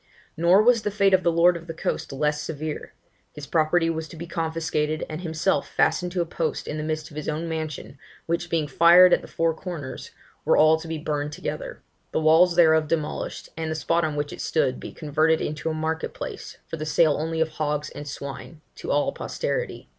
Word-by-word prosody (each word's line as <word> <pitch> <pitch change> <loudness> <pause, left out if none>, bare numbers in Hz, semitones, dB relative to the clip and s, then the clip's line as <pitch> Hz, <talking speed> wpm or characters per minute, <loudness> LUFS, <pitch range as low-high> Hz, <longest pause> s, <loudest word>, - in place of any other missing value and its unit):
Nor 175 +5 +5
was 240 -1 +4
the 210 - -1
fate 200 -1 +2
of 185 - +5
the 170 - +2
lord 170 +2 +4
of 170 0 -8
the 165 - -6
coast - - -3
less 150 +2 0
severe, 155 0 -5 0.4
his 150 - -8
property 160 +3 +2
was 160 -1 -2
to - - -12
be 165 +1 -7
confiscated, 160 -2 -2
and 155 +2 -6
himself 160 -2 0
fastened 175 +3 +1
to 180 - 0
a - - 0
post 165 0 -3
in 150 - -4
the 155 - -3
midst 155 0 -3
of - - -13
his 150 - -3
own 155 +2 -3
mansion, 155 -3 -5 0.3
which 170 +1 -2
being 160 -3 0
fired 170 +5 +7
at - - +3
the - - -11
four 165 0 0
corners, 160 -6 -7 0.3
were - - +3
all 155 +1 +6
to 165 - -9
be 160 0 -3
burned 150 -1 -3
together; - - -6 0.3
the - - +2
walls 165 +3 +5
thereof 160 -2 +5
demolished; 155 -1 -3
and 160 -1 -3
the 160 - -2
spot 165 +3 +1
on 155 -2 -1
which 145 0 -3
it - - -7
stood 130 -5 0
be - - -8
converted 155 +1 +1
into 155 +2 -3
a - - -1
market 160 +1 -3
place, - - -7
for 165 - -6
the 155 - -4
sale 155 -1 +4
only 160 +1 -2
of 160 0 +2
hogs 150 -1 -2
and 145 - -8
swine, 140 +2 -7
to - - -8
all 145 0 +2
posterity. - - -4
160 Hz, 215 wpm, -25 LUFS, 150-170 Hz, 0.4 s, fired